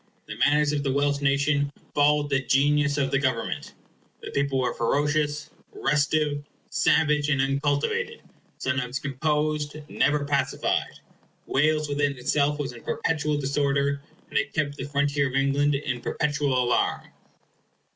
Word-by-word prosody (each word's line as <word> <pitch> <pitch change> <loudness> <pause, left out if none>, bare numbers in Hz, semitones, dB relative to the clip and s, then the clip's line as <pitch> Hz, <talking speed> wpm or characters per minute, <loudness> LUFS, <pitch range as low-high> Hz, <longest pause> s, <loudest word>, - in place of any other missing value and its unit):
The - - -7
manners 145 +3 +3
of 150 -1 -1
the 140 -1 -1
Welsh 145 +1 +1
nation 140 +1 +2 0.2
followed 145 0 +3
the 135 -1 +2
genius 145 +2 +2
of 135 -2 0
the 135 - +2
government. 130 -4 -2 0.5
The - - -6
people 140 -1 0
were 125 -2 0
ferocious, 145 +4 0 0.2
restive, 150 0 +1 0.3
savage, 150 -2 +2
and 145 -2 +2
uncultivated; 145 - 0 0.3
sometimes 130 -1 -2
composed, 150 +2 -1
never 145 -1 +1
pacified. 140 -1 -1 0.4
Wales, 155 +2 +2
within 145 -1 0
itself, 145 +3 +1
was 140 -4 -4
in 120 - -11
perpetual 150 -2 -1
disorder, 140 0 0 0.3
and - - +2
it 140 0 -3
kept 145 -2 -1
the 130 - -4
frontier 145 0 +1
of 130 - -5
England 140 +1 +2
in 135 -3 -3
perpetual 145 -4 0
alarm. 125 - 0
145 Hz, 135 wpm, -25 LUFS, 140-150 Hz, 0.5 s, manners